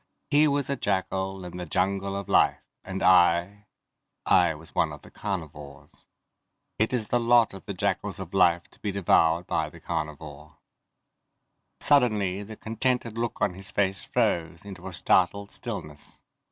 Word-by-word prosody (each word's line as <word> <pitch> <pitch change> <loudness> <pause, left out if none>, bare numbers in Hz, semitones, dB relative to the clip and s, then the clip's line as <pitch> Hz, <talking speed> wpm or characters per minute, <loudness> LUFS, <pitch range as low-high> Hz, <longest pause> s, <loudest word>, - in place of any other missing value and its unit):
He 150 +1 +5
was 140 -2 0
a 140 - -1
jackal 95 -3 -2
in 90 0 -8
the 90 -1 -6
jungle 95 +3 -1
of 100 -1 -5
life, - - +4 0.3
and 95 0 -5
I... 90 +3 +4 0.6
I 80 - +4
was 80 +2 -14
one 80 -3 +1
of 75 -1 -10
the - - -15
carnivores. 75 -8 -7 0.7
It 110 - +2
is 120 -4 -2
the 120 - +2
lot 120 -2 +4
of 95 - -11
the 100 - -4
jackals 100 +1 -2
of 95 -2 -8
life 85 -3 +4
to - - -21
be 105 - -3
devoured 85 -3 +3
by - - -1
the - - -14
carnivore. 75 -1 -6 1.2
Suddenly 105 -9 +3
the 110 +2 -9
contented 115 +1 -1
look 115 0 -2
on - - +1
his 95 +1 -9
face 95 -1 0
froze 85 +1 -1
into 95 -2 -9
a 95 - -6
startled 100 +5 +1
stillness. 75 -1 -8
95 Hz, 160 wpm, -26 LUFS, 85-105 Hz, 1.2 s, He